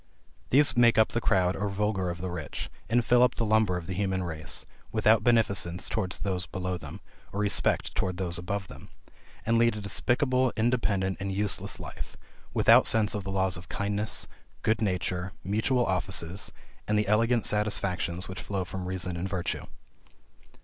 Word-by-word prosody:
These 140 -1 +5
make 120 -2 +5
up 110 - +5
the 120 - -2
crowd 90 -3 +2
or 100 +1 -2
vulgar 100 -2 -1
of 85 0 -5
the 90 -1 -3
rich, 85 -5 -5 0.2
and 120 +1 +2
fill 125 0 +5
up 125 0 +4
the 115 - -1
lumber 110 -4 +3
of 85 - -6
the 95 - -4
human 95 0 -1
race, 80 -3 -4 0.3
without 110 -1 +4
beneficence 100 -7 +2
towards 100 -4 -1
those 90 -2 -3
below 90 -1 -3
them, 90 - -8 0.3
or 100 - -4
respect 100 -3 +2
towards 90 -1 -1
those 90 -2 -1
above 95 +2 -3
them; 70 -3 -12 0.6
and 115 +1 +3
lead 115 -1 +3
a - - -5
despicable, 125 +5 +1
independent, 110 -5 +1
and 100 0 -3
useless 105 +1 -2
life, - - -8 0.3
without - - +6
sense 110 -1 +3
of 105 -2 -3
the - - -4
laws 95 -2 0
of 90 -1 -12
kindness, 105 +3 -2 0.4
good 110 0 +1
nature, 95 -2 -1
mutual 110 +6 +1
offices, 95 -1 -2 0.4
and 105 - +2
the 105 -1 +1
elegant 115 +3 +2
satisfactions 100 -4 0
which 95 - -6
flow 95 -2 -3
from 90 0 -5
reason 90 -1 -3
and 90 +3 -3
virtue. 90 -3 -2
100 Hz, 175 wpm, -28 LUFS, 90-110 Hz, 0.6 s, without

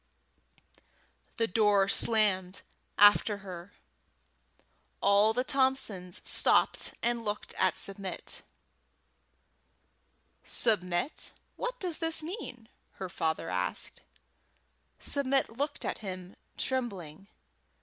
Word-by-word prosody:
The 230 - +2
door 205 -1 +2
slammed 200 -4 +4 0.3
after 205 0 +5
her. 180 +1 -9 1.3
All 200 +2 +4
the 250 +3 -1
Thompsons 260 -10 0
stopped - - +2
and 235 0 -1
looked 210 -1 -4
at 185 -1 +1
Submit. 195 -1 -2 2.0
"Submit, 185 - -1 0.2
what - - -5
does 360 -6 -3
this 325 -1 +5
mean?" 310 - -8 0.3
her 190 -1 -7
father 160 - -3
asked. 90 0 -4 1.0
Submit 270 -3 0
looked 280 +6 -4
at - - -3
him, 185 -2 -8 0.2
trembling. 195 - -4
205 Hz, 90 wpm, -29 LUFS, 185-255 Hz, 2.0 s, after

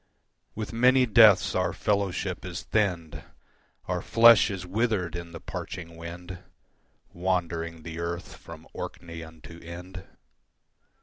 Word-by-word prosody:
With 110 +1 -5
many 125 +2 +5
deaths 110 -3 +6
our - - 0
fellowship 100 -3 -1
is 90 0 -6
thinned, 90 -7 -1 0.6
Our - - -2
flesh 115 -1 +6
is 95 -3 -5
withered 95 -3 -1
in 85 -1 -7
the 85 - -8
parching 85 -3 -7
wind, 85 +2 -8 0.7
Wandering 85 -2 -2
the 80 0 -7
earth 85 +1 -5
from - - -12
Orkney 85 -1 -7
unto 80 +1 -12
Ind. 90 +2 -9
90 Hz, 120 wpm, -27 LUFS, 85-105 Hz, 0.7 s, deaths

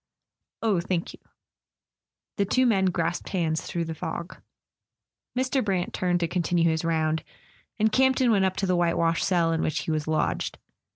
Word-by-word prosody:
"Oh, 210 -5 +2
thank 175 -1 -2
you." - - -14 1.2
The 200 - +2
two 255 +6 +2
men 200 -6 +3
grasped 175 -1 -1
hands 165 -4 0
through 170 -1 -3
the 165 - -4
fog. 170 +3 -6 1.0
Mr. 260 +1 +1
Brant 190 -4 -1
turned 175 -1 0
to 170 - +1
continue 170 -1 +1
his 160 +1 -1
round, 160 -1 0 0.5
and 220 0 +2
Camp 265 +2 +4
ton 255 -3 +3
went 195 -3 +3
up 185 0 0
to 195 0 -1
the 185 -1 +2
white 170 -1 +1
washed 165 0 +1
cell 170 -3 +2
in 165 -1 0
which 155 - -1
he - - -3
was 155 -1 -1
lodged. 155 0 -1
175 Hz, 180 wpm, -26 LUFS, 165-195 Hz, 1.2 s, Camp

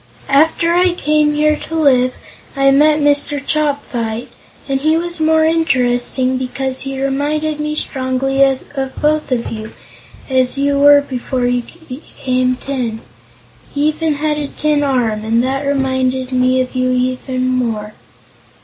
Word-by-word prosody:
After 320 +4 +3
I 360 0 +3
came 300 -2 +1
here 305 0 +3
to 325 - -7
live, 255 -5 +3 0.4
I 275 0 +4
met 300 +2 +4
Mr. 290 0 +1
Chopfyt, 265 -6 -2 0.4
and 270 -1 -1
he 310 +2 +2
was 345 0 -1
the 315 - +1
more 315 0 +3
interesting 255 -5 +1
because 260 +1 -3
he 270 0 -4
reminded 295 +3 -1
me 300 0 -2
strongly 270 -1 -1
of 270 0 -2
both 300 -1 0
of 240 -2 -1
you, 215 -1 -7 0.5
as 260 -1 +1
you 280 0 +1
were 285 0 +7
before 255 -2 -3
you 245 0 +1 0.3
became 255 -1 -2
tin. 250 -4 -4 0.7
He 290 +2 +2
even 310 0 -1
had 300 +1 -1
a 290 - -3
tin 300 0 0
arm, 240 -6 0
and 230 +2 +1
that 270 +2 -2
reminded 260 -2 -1
me 255 0 +2
of 255 - -4
you 255 0 0
the 260 -1 -3
more. 240 -5 -1
270 Hz, 150 wpm, -16 LUFS, 255-300 Hz, 0.7 s, were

